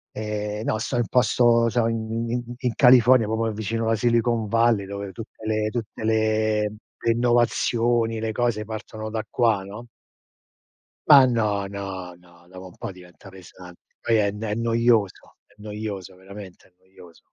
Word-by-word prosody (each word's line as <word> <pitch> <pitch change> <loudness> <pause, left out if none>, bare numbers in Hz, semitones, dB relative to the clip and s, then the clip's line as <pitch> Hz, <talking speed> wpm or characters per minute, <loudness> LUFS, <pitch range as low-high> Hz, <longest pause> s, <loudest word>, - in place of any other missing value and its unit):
Ehm, 105 0 -4
no, 110 - -1
sto 115 +2 -3
in 120 - +1
posto 120 -1 +3
so 115 0 +1
in 115 0 -3
in 120 0 -2
in 125 -3 -2
California 125 -3 +6
proprio 110 0 -1
vicino 110 +2 -3
alla 115 0 +2
Silicon 115 -1 +1
Valley, 115 -2 +2
dove 100 -1 -6
tutte 110 0 -11
le 110 0 0
tutte 110 -1 -6
le 110 -1 +1 0.3
le 115 - +2
innovazioni, 120 -1 +1
le 110 0 -2
cose 110 -2 -1
partono 110 0 -7
da 110 0 -3
qua, 110 -5 +1
no? 105 +5 -10 1.2
Ma 140 -3 +9
no, 105 -5 0
no, 95 -2 -7
no, 85 0 -22
dopo 95 0 -11
un 90 - -16
po' - - -6
diventa 90 +1 -15
pesante. 90 -1 -15
Poi 115 - 0
è 100 -1 +1
n 105 +1 -9
è 105 -2 -2
noioso, 115 -2 0
è - - -28
noioso 105 -3 -7
veramente, 95 0 -12
è 90 - -32
noioso. 95 -2 -18
110 Hz, 165 wpm, -23 LUFS, 100-115 Hz, 1.2 s, Ma